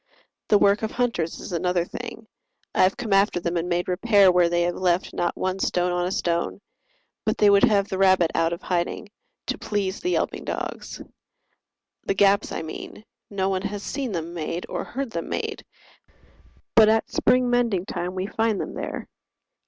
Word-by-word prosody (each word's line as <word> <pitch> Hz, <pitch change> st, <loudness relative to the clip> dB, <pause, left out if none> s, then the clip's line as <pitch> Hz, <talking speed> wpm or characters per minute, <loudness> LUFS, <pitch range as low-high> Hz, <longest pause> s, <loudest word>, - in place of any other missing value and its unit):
The 210 Hz, -, +5 dB
work 200 Hz, +1 st, +3 dB
of 220 Hz, -, -1 dB
hunters 230 Hz, -11 st, -1 dB
is -, -, -8 dB
another 175 Hz, 0 st, 0 dB
thing: 225 Hz, +4 st, -8 dB, 0.5 s
I -, -, +2 dB
have 185 Hz, +1 st, +3 dB
come 220 Hz, -4 st, -2 dB
after 195 Hz, -2 st, +3 dB
them 170 Hz, 0 st, -2 dB
and 170 Hz, +1 st, -1 dB
made 175 Hz, 0 st, 0 dB
repair 200 Hz, +1 st, +4 dB
Where 175 Hz, -1 st, +4 dB
they 175 Hz, 0 st, +1 dB
have 175 Hz, 0 st, 0 dB
left 180 Hz, 0 st, 0 dB
not 175 Hz, -, -1 dB
one 185 Hz, +1 st, -2 dB
stone 180 Hz, -1 st, +1 dB
on 175 Hz, 0 st, 0 dB
a -, -, -3 dB
stone, 170 Hz, -1 st, -1 dB, 0.6 s
But -, -, 0 dB
they 205 Hz, -1 st, +5 dB
would 200 Hz, 0 st, +6 dB
have 200 Hz, -2 st, +2 dB
the 190 Hz, -, -4 dB
rabbit 185 Hz, -3 st, +4 dB
out 165 Hz, 0 st, +1 dB
of 170 Hz, -, -5 dB
hiding, 175 Hz, +2 st, -2 dB, 0.4 s
To -, -, -3 dB
please 200 Hz, -2 st, -2 dB
the 360 Hz, -, -2 dB
yelping -, -, -1 dB
dogs. -, -, -5 dB, 1.0 s
The 195 Hz, -, +1 dB
gaps 200 Hz, +1 st, +3 dB
I -, -, -3 dB
mean, 160 Hz, +6 st, -8 dB, 0.2 s
No 190 Hz, -2 st, -1 dB
one 190 Hz, -1 st, -1 dB
has 200 Hz, 0 st, -4 dB
seen 265 Hz, -4 st, -3 dB
them 170 Hz, -2 st, -4 dB
made 170 Hz, +1 st, -4 dB
or -, -, -3 dB
heard 265 Hz, -1 st, -5 dB
them 170 Hz, -5 st, -4 dB
made, -, -, -3 dB, 1.1 s
But 220 Hz, -2 st, +7 dB
at 220 Hz, 0 st, +1 dB
spring 250 Hz, 0 st, +3 dB
mending 230 Hz, -7 st, +1 dB
time 180 Hz, 0 st, -4 dB
we 185 Hz, 0 st, -2 dB
find 220 Hz, 0 st, 0 dB
them -, -, -4 dB
there. -, -, -5 dB
190 Hz, 190 wpm, -24 LUFS, 175-210 Hz, 1.1 s, But